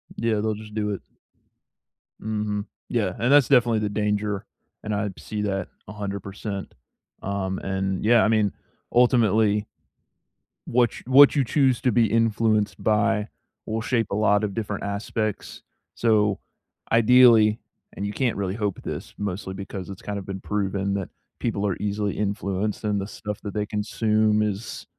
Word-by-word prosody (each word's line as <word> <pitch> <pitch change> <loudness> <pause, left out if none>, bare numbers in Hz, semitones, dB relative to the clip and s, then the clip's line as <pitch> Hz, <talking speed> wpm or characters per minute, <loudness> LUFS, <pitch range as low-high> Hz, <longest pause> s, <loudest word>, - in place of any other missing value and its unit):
Yeah. 115 -1 0
They'll 110 0 0
just 105 0 -10
do 105 -1 -1
it. 100 - -4 1.2
Mhm. 105 -1 -2 0.2
Yeah, 105 -7 0
and 120 +3 +1
that's 145 -4 +6
definitely 120 -4 +4
the 105 -1 -1
danger, 105 -1 -1 0.4
and 110 - -3
I 105 0 -1
see 105 -1 -4
that 95 -2 -2 0.2
100%. 100 -1 -5 0.5
Um, 95 -1 -2
and 95 -1 -2
yeah, 115 +1 +5
I - - +3
mean, 105 -2 +2 0.4
ultimately 110 -4 +3 1.0
what 120 -1 +3
ch - - -11
what 140 +3 +7
you 140 - +3
choose 130 -1 +2
to 125 - +2
be 115 +1 +4
influenced 110 -1 +1
by 105 0 +2 0.4
will 110 +1 -2
shape 115 -2 0
a - - 0
lot 105 0 +3
of 105 -2 -2
different 105 -1 -4
aspects. 105 +1 -3 0.3
So, 105 -3 +2 0.5
ideally 115 -2 +6 0.4
and 100 - -3
you 105 - -4
can't 125 -2 0
really 95 -1 -2
hope 105 -3 -2
this - - -6
mostly 100 -1 -4
because 95 -1 -7
it's 95 -1 -8
kind 105 0 -4
of 100 - -6
been 95 -1 -5
proven 100 -1 -1
that 100 -2 -3 0.3
people 105 -3 -1
are 95 - 0
easily 105 0 -2
influenced 100 0 -2
and 105 -1 0
the 95 - -4
stuff 105 -1 -6
that 100 - -5
they 105 -1 -1
consume 105 0 +1
is 105 +1 -3
105 Hz, 160 wpm, -24 LUFS, 100-110 Hz, 1.2 s, what